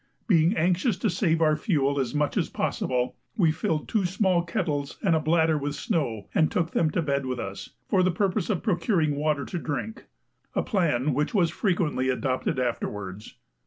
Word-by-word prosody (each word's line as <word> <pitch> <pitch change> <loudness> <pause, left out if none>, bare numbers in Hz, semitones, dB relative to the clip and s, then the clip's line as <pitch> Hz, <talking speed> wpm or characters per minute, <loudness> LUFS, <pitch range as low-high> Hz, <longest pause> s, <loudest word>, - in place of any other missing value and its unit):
Being 170 -1 +3
anxious 180 +5 +2
to 215 - 0
save 165 -3 +1
our 155 -1 +4
fuel 145 -4 +1
as 130 +1 -2
much 150 0 0
as - - 0
possible, 125 -1 -1 0.2
we 170 -7 +4
filled 155 0 -2
two 210 -4 +1
small 185 -1 +2
kettles 150 -5 -2
and 175 -5 +3
a - - +3
bladder 160 0 +2
with 145 +1 -3
snow 120 - -2
and 155 - +3
took 170 -2 0
them 160 - +2
to 165 +2 -1
bed 140 -2 -1
with 130 -1 -2
us, 100 -2 -6 0.2
for 190 - +3
the 185 - +3
purpose 185 +2 0
of 195 -5 -1
procuring 175 -7 +1
water 145 -1 0
to 175 - -4
drink 165 - -5 0.5
a - - +1
plan 150 - +1
which 150 - -1
was 175 -5 +3
frequently 165 - 0
adopted 130 +3 -1
afterwards. 105 -5 -4
155 Hz, 185 wpm, -26 LUFS, 140-180 Hz, 0.5 s, our